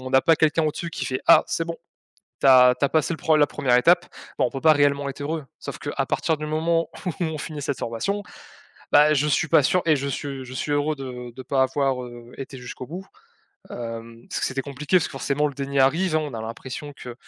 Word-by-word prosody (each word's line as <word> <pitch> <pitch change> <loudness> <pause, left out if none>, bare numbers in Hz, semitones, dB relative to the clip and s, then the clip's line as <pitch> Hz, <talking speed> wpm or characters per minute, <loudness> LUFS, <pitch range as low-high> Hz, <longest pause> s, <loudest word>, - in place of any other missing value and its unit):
on 130 0 -7
a 130 - +6
pas 165 +1 +4
quelqu'un 160 +1 +2
au-dessus 160 +2 -3
qui - - -4
fait: 130 -2 -2
«Ah, 165 - +7
c'est 165 - -1
bon, 165 0 -5 0.7
tu - - +4
as 125 -1 +8
tu - - -1
as - - -2
passé 160 +1 +1
le - - -6
pro 155 0 +2
la 145 - +5
1ère 125 -3 +1
étape.» 175 +7 +4 0.3
bah, - - +4
on 125 - 0
peut 135 - -6
pas 160 -1 +6
réellement 145 -1 +2
être 140 +1 -8
heureux. 155 +1 -3
Sauf, - - -7
qu'à - - -3
partir 160 -2 0
du 150 - -5
moment 165 +2 0 0.2
où, 180 - 0
on 160 -1 -3
finit 150 0 -6
cette 140 -2 -2
formation, 200 - -2 0.7
bah, 150 +1 +6
je 150 +1 +1
suis 150 +1 +1
pas 145 - +5
sûr, 180 +6 +2
et 155 - +4
je 140 0 -3
suis 135 -1 -5
je 125 - -11
suis 145 - -2
heureux 145 +1 +1
de 125 -3 -7
de 130 - -8
pas 130 +1 +1
avoir, 130 -1 0
heu, 120 0 -11
été 135 0 -7
jusqu'au 125 0 -8
bout, 180 +5 -8 0.6
hem, 115 0 -7
parce - - -3
que - - +1
c'était 135 +1 -3
compliqué, 145 +5 -1
parce - - -1
que - - -10
forcément, 140 +2 0
le 145 - -4
déni 140 0 -3
arrive, 160 +5 +3
hein, - - +2
on 145 - -6
a 110 - -5
l'impression 125 +6 -7
que 125 -2 -9
140 Hz, 250 wpm, -24 LUFS, 130-155 Hz, 0.7 s, as